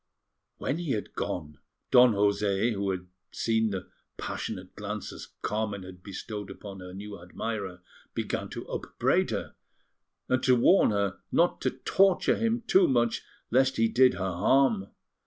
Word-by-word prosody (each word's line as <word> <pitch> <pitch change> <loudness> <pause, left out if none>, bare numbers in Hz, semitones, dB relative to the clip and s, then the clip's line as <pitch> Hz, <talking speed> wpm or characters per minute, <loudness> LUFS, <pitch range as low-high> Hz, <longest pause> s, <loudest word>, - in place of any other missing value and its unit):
When 150 - -2
he 165 -6 -1
had 105 - -4
gone, 75 -4 -4 0.3
Don 125 -2 +7
José, 100 +2 +2
who 100 -1 -1
had 90 -1 -3 0.3
seen 110 -1 +1
the 95 -2 -5 0.3
passionate 90 0 -5
glances 105 0 -6 0.2
Carmen 105 -2 -2
had 90 -1 -11
bestowed 105 +1 -6
upon 100 -2 -9
her 90 0 -9
new 100 0 -8
admirer, 95 0 -5 0.3
began - - -2
to - - -7
upbraid - - 0
her, - - -3 0.7
and 130 0 +2
to 130 -1 +5
warn 175 +11 +5
her 100 -3 0
not - - +2
to - - +2
torture 195 -1 +3
him 230 +1 0
too 190 - +5
much, 120 -3 +2 0.3
lest 130 +2 +3
he 115 0 +4
did 125 +2 +5
her 95 -1 -2
harm. 105 +2 +3
105 Hz, 150 wpm, -28 LUFS, 95-125 Hz, 0.7 s, Don